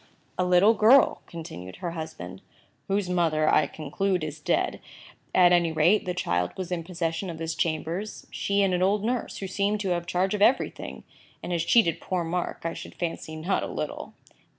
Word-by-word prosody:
"A 180 - 0
little 180 +4 +5
girl," 230 +5 +5
continued 155 - -8
her 175 - -4
husband, 155 - -7 0.5
"whose 195 -1 0
mother, 165 -4 +1
I 155 - +4
conclude, 180 +4 -2
is 155 0 -5
dead. 150 - 0 0.5
At 180 -1 +6
any 175 -2 +3
rate, 165 +7 +3
the 180 -1 -2
child 90 - -1
was 185 -1 -5
in 170 -2 -2
possession 170 +1 -3
of 165 - -6
his 165 0 -3
chambers; 170 +5 -3
she 200 0 +1
and 190 -2 +2
an 180 - 0
old 200 +2 +2
nurse, 245 +2 -2
who 195 - -5
seemed 200 +2 0
to 195 - -2
have 175 -1 +1
the - - -9
charge 185 +2 +1
of 210 - -2
everything, 240 +6 +1 0.4
and - - -4
has 170 -2 0
cheated 170 -5 +3
poor 180 -2 -1
Mark, 175 +2 -3
I 165 0 -2
should - - -9
fancy, 165 -2 -4
not 170 +5 -1
a - - -3
little." - - -5
175 Hz, 195 wpm, -26 LUFS, 160-195 Hz, 0.5 s, At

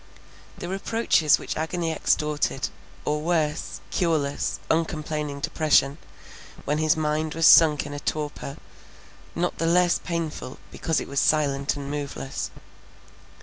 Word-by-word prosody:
The 175 - -6
reproaches 195 -4 +2
which - - -5
agony 165 +1 -2
extorted; 150 -3 0 0.4
or 150 0 0
worse, 160 -2 -1
cureless, 155 -5 0
uncomplaining 155 -3 -2
depression, 150 -1 +2 0.7
when 150 +1 0
his 155 0 +3
mind 155 0 -1
was 165 0 +2
sunk 150 -4 +7
in 145 - -7
a 145 - -4
torpor, 150 -2 -4 0.8
not 175 +1 -1
the 165 - +1
less 175 +1 +3
painful 165 -6 -4
because 160 -2 -1
it - - -6
was 140 0 -1
silent 140 -3 +2
and 140 0 -6
moveless. 140 -2 -4
155 Hz, 125 wpm, -25 LUFS, 145-165 Hz, 0.8 s, sunk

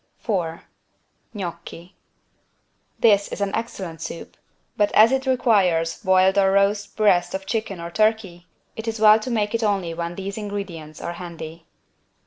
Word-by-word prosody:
4 170 -7 -3 0.7
GNOCCHI 170 -1 -7 1.1
This 205 -3 +4
is - - -7
an 200 -1 -1
excellent 190 -8 -5
soup, 165 0 -7 0.4
but 205 -1 +2
as 220 +3 +6
it 265 0 0
requires 195 -11 +2
boiled 190 -1 +4
or 195 -1 +4
roast 200 +1 +1
breast 180 -5 +3
of 190 0 -5
chicken 210 -3 -3
or 170 0 -6
turkey 215 -4 0 0.3
it 225 +1 -7
is 225 -1 -3
well 215 0 +7
to 225 - -6
make 215 -3 -1
it 230 - 0
only 195 -6 0
when 170 +1 -4
these 195 +3 -5
ingredients 190 -7 -6
are 170 - -4
handy. 165 -2 -9
195 Hz, 150 wpm, -22 LUFS, 170-215 Hz, 1.1 s, well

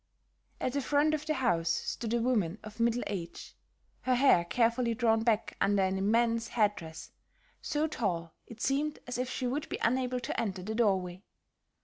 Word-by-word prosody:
At 255 - -1
the 280 - 0
front 295 +3 +2
of 305 0 -2
the 310 - +1
house 175 - +1
stood 225 +7 -1
a - - +2
woman 215 -7 +1
of 215 +2 -10
middle 235 +1 +2
age, 175 -4 -6 0.5
her 255 -1 +2
hair 245 -9 +5
carefully 235 +3 +1
drawn 225 -1 +2
back 225 -1 0
under 200 -1 +3
an 190 0 +1
immense 230 +3 +2
head 210 -3 +2
dress, 160 -2 -9 0.5
so 300 +1 0
tall 175 - -2
it 225 -1 -11
seemed 295 +3 0
as 245 0 -4
if 250 0 -1
she 255 - -3
would 275 +5 -2
be - - -3
unable 250 +1 +1
to - - -3
enter 190 -5 -3
the 215 +3 -4
doorway. 190 -5 +1
230 Hz, 180 wpm, -31 LUFS, 195-255 Hz, 0.5 s, hair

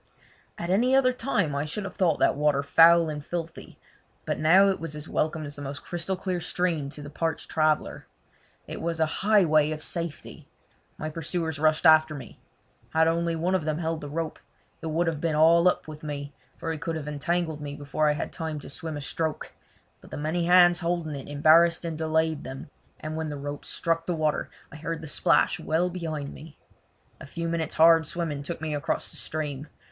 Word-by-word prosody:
At 170 +1 -3
any 245 +7 +3
other 255 -1 +4
time 230 - -1
I 140 +1 -1
should 175 +7 -3
have 195 - -6
thought 170 -5 +2
that - - +3
water 145 -1 +2
foul 165 +3 +6
and 150 -2 -5
filthy, 165 +1 -6 0.5
but - - -2
now 185 +6 +6
it 195 - -1
was 165 -2 -6
as 150 +1 -6
welcome 155 0 -1
as 145 0 -6
the 145 - -9
most 140 0 -6
crystal 175 +2 -3 0.2
stream 165 -4 -1
to 145 +1 -8
the 145 - -8
parched 165 +1 -3
traveller. 155 -1 0 0.6
It - - -7
was 165 0 -2
a 160 - +4 0.2
highway 175 -8 +4
of 155 0 -4
safety! 170 -3 -5 0.5
My 155 0 -4
pursuers 160 -1 -3
rushed 155 +2 +2
after 155 -1 +6
me. 130 -5 -10 0.5
Had 160 0 +3
only 165 0 0
one 170 +3 0
of 185 -4 +1
them 155 0 -1
held 165 -1 -2
the 145 - -7
rope 160 +1 -4 0.4
it - - -5
would 165 +2 0
have 160 -3 -2
been 165 -2 0
all 165 +3 +5
up 180 - +1
with 155 -1 -9
me, 145 -1 -6 0.2
for 165 - -3
he 160 - -4
could 165 +1 -3
have 150 -2 -5
entangled 160 +1 -2
me 145 -1 -5
before 145 +1 0
I - - +3
had 150 - -4
time 160 -2 -4
to - - -9
swim 155 +1 -5
a - - -5
stroke; 160 +3 -3 0.5
but - - -15
the - - -6
many 160 +3 -1
hands 175 -1 +6
holding 170 -3 -2
it 140 -1 -7
embarrassed 160 +4 +4
and 165 -1 -3
delayed 160 -1 0
them, 135 +2 -8 0.3
and 155 0 -5
when 160 -1 -3
the 145 - -5
rope 145 +1 -6
struck 165 0 -1
the 175 - 0
water 155 -1 -1 0.2
I 150 - -10
heard 165 +1 -4
the - - -8
splash 145 - +2
well 170 +3 0
behind 155 -5 -4
me. 155 -1 -12 0.6
A - - -10
few 170 +3 -4
minutes' 165 -2 -2
hard 165 -1 +6
swimming 160 -4 -3
took 160 +3 -6
me 155 -1 -3
across 145 +1 -2
the - - -8
stream. 150 -2 -4
160 Hz, 205 wpm, -26 LUFS, 150-170 Hz, 0.6 s, foul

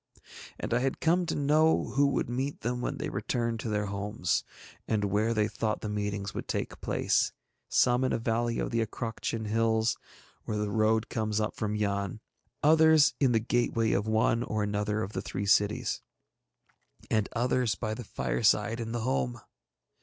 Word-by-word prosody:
And - - -3
I 120 - +3
had 135 +1 -1
come 175 +2 +2
to - - -1
know 155 +3 +3
who 140 +1 +3
would 140 - 0
meet 130 +4 -3
them 125 +1 -2
when - - -2
they - - -3
returned 115 -1 -2
to 110 - -4
their 105 -1 0
homes, 100 -1 -1 0.4
and 105 -2 +1
where 105 +3 +1
they 105 -2 +2
thought 110 +1 -2
the 105 - -4
meetings 105 -1 -3
would - - -5
take - - -3
place, - - +1 0.4
some 125 0 +3
in 130 - +1
a - - +1
valley 115 +1 0
of - - -2
the 115 -1 +1
Acroctian 115 0 -4
hills 110 +1 +1 0.4
where 105 - -3
the 105 -1 -1
road 110 0 +2
comes 110 -2 -1
up 105 0 -1
from 105 -1 -2
Yann, 100 0 -1 0.4
others 160 0 +6
in 135 -3 +4
the 115 - +3
gateway 115 -1 +1
of 100 +2 0
one 110 +1 +2
or 110 -3 -1
another 105 +1 -1
of 95 +3 -6
the 95 - -2
three 100 +1 -4
cities, 100 0 +2 1.1
and 110 -2 +1
others 125 -1 +1
by 110 -2 -3
the 120 - -6
fireside 65 - +1
in 115 0 -4
the 120 - -2
home. 125 -1 -1
110 Hz, 180 wpm, -29 LUFS, 105-120 Hz, 1.1 s, others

